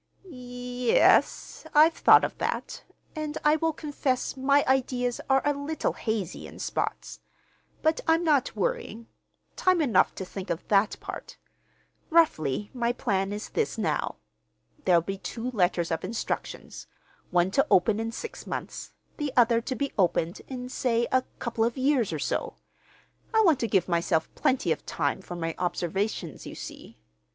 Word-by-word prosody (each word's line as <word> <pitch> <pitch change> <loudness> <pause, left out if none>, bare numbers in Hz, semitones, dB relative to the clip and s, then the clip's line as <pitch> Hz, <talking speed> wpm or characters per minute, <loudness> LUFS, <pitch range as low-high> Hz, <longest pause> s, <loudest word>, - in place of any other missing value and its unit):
"Y 385 - -16
yes, 250 +3 +1
I've 315 +2 +7
thought - - +6
of - - -2
that, - - -3 0.3
and 305 -1 -4
I 300 +1 +5
will 325 +1 +1
confess 290 -5 -2
my 275 +2 +3
ideas 250 -2 0
are 270 0 +4
a 290 - +3
little 285 +3 -2
hazy, 215 -6 -3
in - - -12
spots. - - -3 0.6
But 315 0 +2
I'm 325 +1 +3
not 295 -6 +2
worrying. 475 - -2 0.5
Time 370 -1 +3
enough 240 - +3
to 190 - -5
think 190 +1 -7
of 170 - -3
that 205 +1 +3
part. - - -8 0.7
Roughly, 205 - +2
my 240 -1 0
plan 195 -6 -1
is 210 +1 -5
this 455 - -1
now. - - -1 0.7
There'll 175 -2 +5
be 195 +2 -5
two 240 +5 -5
letters 175 -6 +1
of 165 - -2
instructions: 230 - -5 0.4
one 180 +1 +2
to 275 +7 +2
open 200 +4 +4
in 225 0 -2
six 455 - -7
months, - - -6 0.2
the 295 -3 -2
other 235 -1 +5
to 260 +3 -4
be 280 +3 -3
opened 170 -2 +1
in, 250 -2 -6
say, 240 -2 0
a 260 - +4 0.2
couple 235 -2 -1
of 235 +3 0
years, 260 -6 +2
or 160 - -2
so. 140 - -2 0.8
(I 440 - +6
want 330 - +4
to 230 - 0
give 190 -4 +2
myself 170 -2 0
plenty 250 -10 +1
of - - -1
time 145 +3 -1
for 180 - -8
my 165 -1 -3
observations, 180 -1 -2
you - - -8
see.) - - -10
240 Hz, 160 wpm, -27 LUFS, 190-280 Hz, 0.8 s, I've